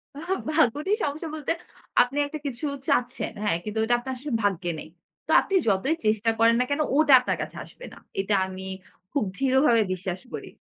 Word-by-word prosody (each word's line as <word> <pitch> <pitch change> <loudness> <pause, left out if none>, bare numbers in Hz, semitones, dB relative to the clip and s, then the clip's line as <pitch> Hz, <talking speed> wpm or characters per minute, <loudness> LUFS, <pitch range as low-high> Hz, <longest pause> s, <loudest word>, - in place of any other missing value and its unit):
আ 285 - -7 0.4
ভাগ্য 265 -8 +4
নিয়ে 415 +2 +2
সমস্যা 295 +3 -4
বলতে 305 0 -2 0.5
আপনি 250 +3 0
একটা 305 +1 -6
কিছু 265 +3 -4 0.2
চাচ্ছেন 250 -3 0
হ্যাঁ, 205 -5 +2
কিন্তু 210 +1 -5
ওটা 240 +2 +2
আপনার 260 +2 -5
আসলে 285 +3 -6
ভাগ্যে 180 -3 0
নেই - - -9 0.4
তো - - -1
আপনি 390 - -7
যতই 210 +10 +2
চেষ্টা 215 +1 +2
করেন 230 0 +5
না - - +4
কেন 285 +2 +1 0.2
ওটা 305 -3 +5
আপনার 250 - -1
কাছে - - -6
আসবে - - -12
না। - - -13 0.2
এটা 200 +2 -1
আমি 190 0 -7 0.5
খুব 280 -3 +1
দৃঢ়ভাবে 265 -2 +4
বিশ্বাস 185 0 -4
করি। - - -6
245 Hz, 190 wpm, -26 LUFS, 210-285 Hz, 0.5 s, করেন